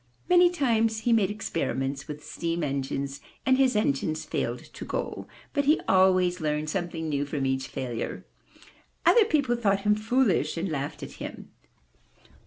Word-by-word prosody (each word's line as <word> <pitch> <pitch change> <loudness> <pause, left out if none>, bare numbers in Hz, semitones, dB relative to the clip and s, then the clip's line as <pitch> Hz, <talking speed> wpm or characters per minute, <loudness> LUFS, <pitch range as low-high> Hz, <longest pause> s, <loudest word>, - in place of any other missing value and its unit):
Many 355 0 +6
times 225 -9 +1
he 235 - +2
made 210 -4 +3
experiments 140 -9 -3
with 150 0 -7
steam 170 0 -3
engines 140 0 -3 0.2
and 260 - +5
his 260 -4 +4
engines 155 -5 0
failed - - -2
to - - -7
go, - - -4 0.3
but 285 - +1
he 300 +3 +4
always 185 -2 +4
learned 150 0 -1
something 170 -3 -3
new 145 -2 0
from 145 -1 -2
each 130 0 -1
failure. 120 -3 -4 0.8
Other 460 -3 +6
people 285 - +1
thought 200 -4 +1
him 210 +1 +3
foolish 215 - +1
and 175 +3 -2
laughed 145 -2 -4
at - - -7
him. - - -7
180 Hz, 155 wpm, -27 LUFS, 145-230 Hz, 0.8 s, Many